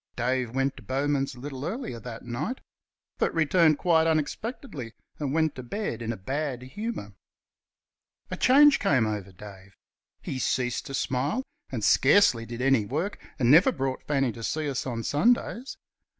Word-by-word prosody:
Dave 125 0 0
went 135 0 0
to - - -10
Bowman's 135 0 -1
a - - -13
little 135 0 -6
earlier 205 - -4
that 115 -1 -9
night 140 - -3 0.6
but - - +2
returned 160 -1 +4
quite 165 -2 +3
unexpectedly 155 - -3 0.3
and 145 -3 -2
went 160 0 +1
to 130 - -7
bed 125 - -4
in 115 0 -2
a 115 - -5
bad 135 +4 -3
humour. 130 - -5 1.2
A - - -1
change 285 +3 +6
came 130 -6 +3
over 105 -3 -4
Dave. 95 0 -13 0.4
He 130 - -5
ceased 125 -1 -1
to 135 - -4
smile, 135 - -1 0.3
and 120 -5 -3
scarcely 125 - +4
did 120 +1 -5
any 135 -4 +4
work, 155 - -3 0.2
and 125 -1 +3
never 165 +6 +7
brought 135 -1 -3
Fanny 135 -4 +1
to 115 - -10
see 150 +6 -2
us 135 -1 -2
on 115 -2 -3
Sundays. 240 - +1
135 Hz, 165 wpm, -27 LUFS, 120-160 Hz, 1.2 s, never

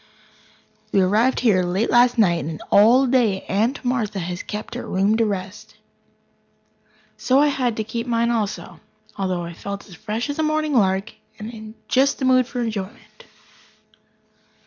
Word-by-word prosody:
We 200 - +3
arrived 215 +7 +2
here 210 -7 +3
late 180 +5 -1
last 245 0 +4
night, 175 - +3
and 155 +1 -6
all 235 +6 +6
day 240 -7 +1
Aunt 225 +7 -1
Martha 235 -5 -1
has 180 0 -4
kept 210 +1 -7
her - - -6
room 195 +3 +1
to 230 -1 +2
rest. 195 -1 -6 1.4
So 260 - +2
I 295 +1 +4
had 250 -5 -1
to 220 - -1
keep 230 +2 -5
mine 235 0 +1
also, 215 -4 -3 0.4
although 185 -3 -2
I 170 0 -7
felt 200 +3 -7
as 185 - -14
fresh 215 +6 -4
as 285 - -7
a - - +3
morning 310 -1 0
lark, 195 -2 +1 0.2
and 220 0 -9
just 270 +2 +2
in 260 - 0
the 260 - +5
mood 255 -1 +3
for 250 -1 -4
enjoyment. 215 -2 -6
220 Hz, 165 wpm, -21 LUFS, 195-245 Hz, 1.4 s, all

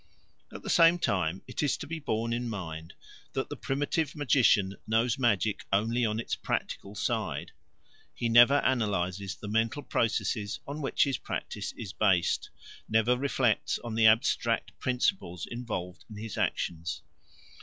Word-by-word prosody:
At - - -9
the - - -5
same 170 0 +6
time 95 - -1
it - - -4
is 145 -3 +1
to - - -6
be 165 +2 -5
borne 115 -5 -1
in 120 0 -2
mind 80 -6 -6 0.4
that - - -2
the - - -4
primitive 145 +2 -1
magician 120 -9 +3
knows 115 +3 +1
magic 110 -4 +1
only 115 +5 +1
on 110 +1 -2
its 115 - -4
practical 100 +1 -3
side; - - -2 0.6
he 120 - -2
never 120 +5 +6
analyses 100 -6 0
the 105 - -9
mental 115 +6 0
processes 110 -3 -1
on 145 +2 -5
which 135 - +2
his 135 -3 -1
practice - - -4
is 105 -4 -7
based, 95 -5 +2 0.4
never 110 +3 +3
reflects 125 -4 +1
on 120 -2 -5
the 110 0 +5
abstract 110 +2 +2
principles 125 - -1
involved 105 -7 -5
in 105 - -9
his 110 0 -6
actions. 85 0 -2
115 Hz, 150 wpm, -29 LUFS, 100-125 Hz, 0.6 s, same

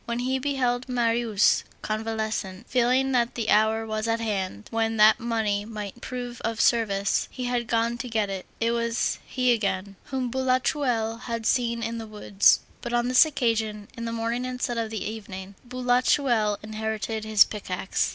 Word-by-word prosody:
When 235 0 -2
he 260 +2 0
beheld 255 -2 -1
Marius 230 -3 +2 0.2
convalescent, 220 -2 -3
feeling 255 +2 +2
that 240 -2 +1
the 225 -3 -1
hour 220 +1 +3
was 215 0 -2
at 230 0 +1
hand, 190 - -3
when 225 0 0
that 215 +2 +6
money 220 -4 0
might 210 +1 -7
prove 245 -1 -6
of 225 0 -2
service, 200 -4 +2
he 255 - -6
had 245 -1 -1
gone 230 +1 0
to 255 - -5
get 220 -2 +1
it; 195 -2 -5
it 230 0 +1
was 235 0 0
he 250 -1 +2
again, 195 -3 -2
whom 260 -3 -3
Boulatruelle 255 -3 0
had 230 -2 -3
seen 235 -1 +1
in 230 0 -3
the 225 - -7
woods, 210 -2 +3 0.2
but 240 - -5
on 240 +1 +1
this 255 +5 +7
occasion, 220 -7 -1
in 230 -1 -5
the 230 - -3
morning 230 +2 -2
instead 250 -2 -2
of 230 - 0
in - - -8
the - - -4
evening. 200 -3 -7
Boulatreulle 245 -3 +2
inherited 220 0 -3
his 215 -1 +6
pickaxe. 190 -2 -2
230 Hz, 170 wpm, -26 LUFS, 215-245 Hz, 0.2 s, this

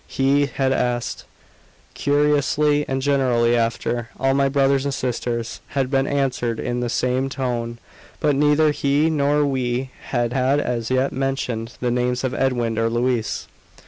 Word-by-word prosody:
He 140 +1 +2
had 135 0 0
asked, 120 -2 -2 0.7
cursorily 145 0 +2
and 135 0 -2
generally, 125 -4 +2
after 115 0 -1
"all 135 +1 +2
my 135 0 +2
brothers 135 -1 +2
and 140 - -1
sisters," 120 -2 -3 0.2
and 135 -1 0
been 135 0 +2
answered 125 -5 -1
in 125 0 -2
the 120 -1 -2
same 125 +3 0
tone; 120 -4 -3 0.4
but 150 -2 +2
neither 150 +2 +4
he 145 +2 +1
nor 145 0 +2
we 130 -1 -1 0.2
had 120 -2 0
as 130 -3 0
yet 130 +1 +1
mentioned 130 -4 -2
the 125 -1 0
names 125 +1 0
of 130 -1 -1
Edwin 120 -4 0
or 115 0 +2
Louise. 120 -1 -1
130 Hz, 145 wpm, -22 LUFS, 120-140 Hz, 0.7 s, neither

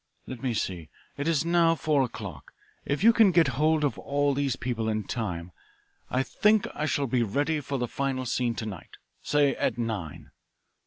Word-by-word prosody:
"Let 130 -2 -8
me 125 -3 -1
see. 90 -7 -3 0.3
It 145 +2 -3
is 165 -1 +1
now 170 -1 +4
four 155 -3 +1
o'clock. 100 - -6 0.3
If 140 +6 -1
you 230 +1 +7
can 225 -3 +6
get 165 -4 +4
hold 155 +4 +2
of 140 -6 0
all 145 0 0
these 135 -2 0
people 115 -3 -2
in 110 -1 -1
time 90 -6 -4 0.6
I 130 +1 +1
think 210 - +2
I 155 - -2
shall 145 -2 0
be 125 -1 +1
ready 145 +8 0
for 140 -1 -3
the 120 -1 -2
final 135 0 -2
scene 120 -1 0
to 110 - -4
night 100 -6 -8 0.2
say, 145 -1 +2
at - - -1
nine. 110 -10 -4
135 Hz, 190 wpm, -27 LUFS, 115-150 Hz, 0.6 s, you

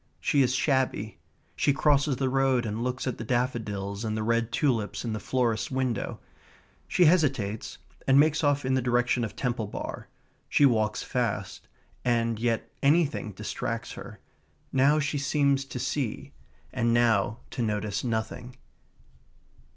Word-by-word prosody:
She 140 - +2
is 130 -1 +2
shabby. 130 -7 0 0.4
She 145 - +2
crosses 145 0 +2
the 130 +1 -1
road 130 -2 +2
and 110 +2 -3
looks 125 +1 -2
at 130 - -3
the - - -3
daffodils 110 -4 -2
and 110 -1 -2
the 110 - -1
red 115 +1 +1
tulips 120 -7 0
in 115 - -2
the 110 - -3
florist's 115 0 0
window. 130 -4 -2 0.7
She 180 - +4
hesitates, 135 - +1 0.3
and 135 +1 +6
makes 155 +2 +3
off 145 -1 +2
in 130 - +1
the 130 - +2
direction 120 0 +1
of 110 - -4
Temple 120 -4 -2
Bar. - - -6 0.4
She 145 - +5
walks 110 -5 +2
fast, - - -3 0.4
and 115 -2 +1
yet 115 -1 -1
anything 145 -7 +2
distracts - - -4
her. - - -9 0.5
Now 140 +3 +4
she 145 -1 -1
seems 140 -1 +1
to 135 - -7
see, 135 +1 -3 0.4
and 120 -2 +1
now 115 -1 +2
to - - -3
notice 105 -3 -1
nothing. 115 +1 -3
125 Hz, 150 wpm, -27 LUFS, 110-140 Hz, 0.7 s, and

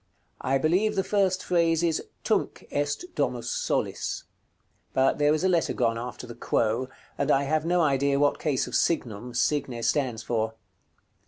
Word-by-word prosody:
I 135 - +2
believe 180 +10 +2
the 190 - +1
first 190 -2 +1
phrase 170 -2 +2
is, 165 -2 +1 0.2
"Tunc - - -1
est 145 - -1
Domus - - -1
solis;" - - -2 0.7
but 135 +2 +2
there 145 0 +4
is 155 +3 +1
a - - +4
letter 175 -3 +2
gone 115 -2 0
after 125 +1 -6
the 120 - -8
"quo," 115 +3 0 0.3
and 140 - 0
I 140 -1 +4
have 155 +2 0
no 175 0 +3
idea 140 -2 +2
what 145 0 +2
case 145 -5 0
of - - -9
signum 120 -6 0
"signe" 130 -2 0
stands 125 -6 0
for. 110 -1 -1
145 Hz, 165 wpm, -27 LUFS, 125-170 Hz, 0.7 s, there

